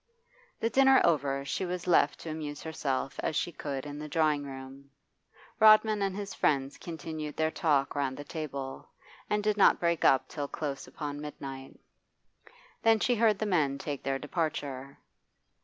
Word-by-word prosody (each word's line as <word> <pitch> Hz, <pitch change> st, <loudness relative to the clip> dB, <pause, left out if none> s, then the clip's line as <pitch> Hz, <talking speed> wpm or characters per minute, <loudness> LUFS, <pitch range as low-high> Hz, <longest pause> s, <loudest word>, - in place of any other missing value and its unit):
The 230 Hz, -, 0 dB
dinner 270 Hz, 0 st, +6 dB
over, 140 Hz, -4 st, +1 dB
she 165 Hz, -, -2 dB
was 180 Hz, -1 st, -3 dB
left 165 Hz, -5 st, +3 dB
to 160 Hz, -, -5 dB
amuse 150 Hz, -2 st, -6 dB
herself 135 Hz, -4 st, -3 dB
as 160 Hz, -, -1 dB
she 175 Hz, -, 0 dB
could 140 Hz, -4 st, -5 dB
in 145 Hz, 0 st, -7 dB
the 150 Hz, -, -6 dB
drawing 150 Hz, -1 st, +1 dB
room. 135 Hz, +1 st, -10 dB, 0.7 s
Rodman 215 Hz, -1 st, +6 dB
and 195 Hz, -1 st, 0 dB
his 200 Hz, -1 st, -5 dB
friends 135 Hz, -1 st, 0 dB
continued 155 Hz, -2 st, -6 dB
their 160 Hz, 0 st, +1 dB
talk 145 Hz, -5 st, +1 dB
round 135 Hz, -2 st, -1 dB
the 145 Hz, -, -6 dB
table, 140 Hz, -3 st, -6 dB, 0.4 s
and 210 Hz, 0 st, +1 dB
did 210 Hz, 0 st, +1 dB
not 200 Hz, -, +5 dB
break 170 Hz, -1 st, +1 dB
up 135 Hz, -, +4 dB
till 145 Hz, -2 st, -4 dB
close 140 Hz, -3 st, -5 dB
upon 145 Hz, +2 st, -6 dB
mid 150 Hz, 0 st, -8 dB
night. 135 Hz, -1 st, -8 dB, 1.0 s
Then 225 Hz, -1 st, +4 dB
she 245 Hz, -, +2 dB
heard 225 Hz, -3 st, +3 dB
the 215 Hz, -, -2 dB
men 155 Hz, -9 st, +1 dB
take 140 Hz, -1 st, -5 dB
their 135 Hz, 0 st, -1 dB
departure. 140 Hz, -3 st, -3 dB
150 Hz, 170 wpm, -30 LUFS, 140-175 Hz, 1.0 s, dinner